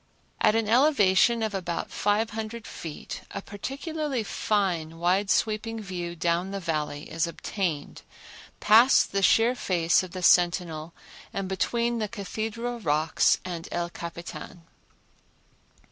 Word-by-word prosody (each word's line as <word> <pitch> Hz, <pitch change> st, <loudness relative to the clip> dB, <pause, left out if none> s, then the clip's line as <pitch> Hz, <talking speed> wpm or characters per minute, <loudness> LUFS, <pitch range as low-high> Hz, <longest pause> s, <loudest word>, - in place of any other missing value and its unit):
At 215 Hz, -, +4 dB
an 225 Hz, -2 st, +1 dB
elevation 235 Hz, -3 st, +4 dB
of 215 Hz, -1 st, -2 dB
about 180 Hz, -3 st, -3 dB
five 210 Hz, +2 st, +1 dB
hundred 220 Hz, +1 st, -5 dB
feet 160 Hz, -3 st, -7 dB
a -, -, -5 dB
particularly 270 Hz, -, -4 dB
fine, 180 Hz, -7 st, -1 dB
wide 185 Hz, +4 st, +1 dB
sweeping 225 Hz, +1 st, 0 dB
view 175 Hz, -4 st, -5 dB
down 170 Hz, +2 st, 0 dB
the 200 Hz, 0 st, -4 dB
Valley 150 Hz, -4 st, -3 dB
is 165 Hz, +1 st, 0 dB
obtained, 170 Hz, -3 st, -4 dB, 0.6 s
past 230 Hz, +5 st, +5 dB
the 195 Hz, -, 0 dB
sheer 225 Hz, +5 st, +4 dB
face 170 Hz, -8 st, +2 dB
of 185 Hz, -, -7 dB
the 180 Hz, +1 st, -7 dB
Sentinel 175 Hz, -3 st, +2 dB, 0.4 s
and 195 Hz, -1 st, -3 dB
between 235 Hz, +5 st, 0 dB
the 215 Hz, -, -1 dB
Cathedral 225 Hz, +3 st, -4 dB
Rocks 155 Hz, -4 st, +2 dB
and 175 Hz, -2 st, -5 dB
El 175 Hz, 0 st, -2 dB
Capitan. 170 Hz, +1 st, -8 dB
195 Hz, 130 wpm, -27 LUFS, 170-225 Hz, 0.6 s, past